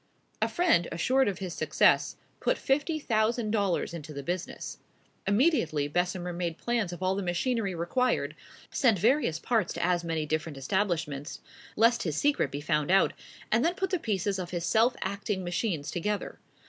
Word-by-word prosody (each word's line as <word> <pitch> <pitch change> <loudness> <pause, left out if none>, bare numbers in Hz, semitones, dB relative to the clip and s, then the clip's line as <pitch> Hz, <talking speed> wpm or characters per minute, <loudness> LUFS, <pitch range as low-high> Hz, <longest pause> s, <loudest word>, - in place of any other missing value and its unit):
A - - +2
friend, 340 - +3
assured 255 +11 +2
of 195 -3 -1
his 185 -3 -5
success, - - +3 0.2
put - - +1
fifty 295 +4 0
thousand 225 -4 0
dollars 200 -6 0
into 155 -2 -7
the 140 -1 -6
business. 175 +4 -4 0.5
Immediately 200 - +2
Bessemer 175 +2 -1
made 170 -1 -3
plans 235 -6 -1
of 175 +1 -6
all 185 +1 +2
the 200 - -2
machinery 195 +2 -1
required, 245 +10 0 0.4
sent 240 -7 +3
various 225 - +2
parts 225 +6 0
to - - -1
as 175 -1 +1
many 165 -2 -1
different 155 -1 -2
establishments, 160 -2 -2 0.4
lest 230 +2 +4
his 155 -4 -2
secret 285 - +2
be 140 +2 -5
found 150 -1 0
out, 195 +1 +4 0.4
and 225 +3 +3
then 345 +2 +1
put 385 0 -2
the 365 - +1
pieces 200 - -1
of 180 -2 -4
his 175 -1 -3
self 230 +5 +3
acting 200 0 -2
machines 175 -4 -2
together. 205 +4 -3
190 Hz, 170 wpm, -29 LUFS, 170-230 Hz, 0.5 s, lest